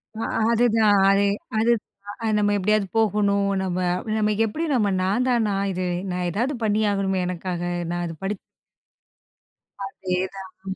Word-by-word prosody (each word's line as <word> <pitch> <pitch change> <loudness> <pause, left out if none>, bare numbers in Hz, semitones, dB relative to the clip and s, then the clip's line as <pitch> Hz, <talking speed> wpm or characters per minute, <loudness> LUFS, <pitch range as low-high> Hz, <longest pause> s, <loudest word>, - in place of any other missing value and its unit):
அ - - -7 0.3
அதுதான். 225 -3 +4
அதே 200 +1 +4 0.3
அது 235 +2 +3 0.5
அ - - 0
நம்ம 205 0 +2
எப்பிடியாவது 205 +1 +1
போகணும், 200 -2 +2
நம்ம 185 -1 -2 0.4
நம்ம 210 0 +2
எப்பிடி 315 +10 -3
நம்ம 210 -5 +2
நான் 210 +7 +1
தானா! 220 -5 +2 0.2
இது 185 0 -2 0.3
நான் 180 0 -1
எதாவது 245 - -1
பண்ணியாகணுமே! 200 -3 +1
எனக்காக 180 0 -4 0.3
நான் 175 0 -2
அத 165 - -5
படிச் 195 0 -2 1.5
அதேதான். 190 0 -5
200 Hz, 130 wpm, -23 LUFS, 190-215 Hz, 1.5 s, அதுதான்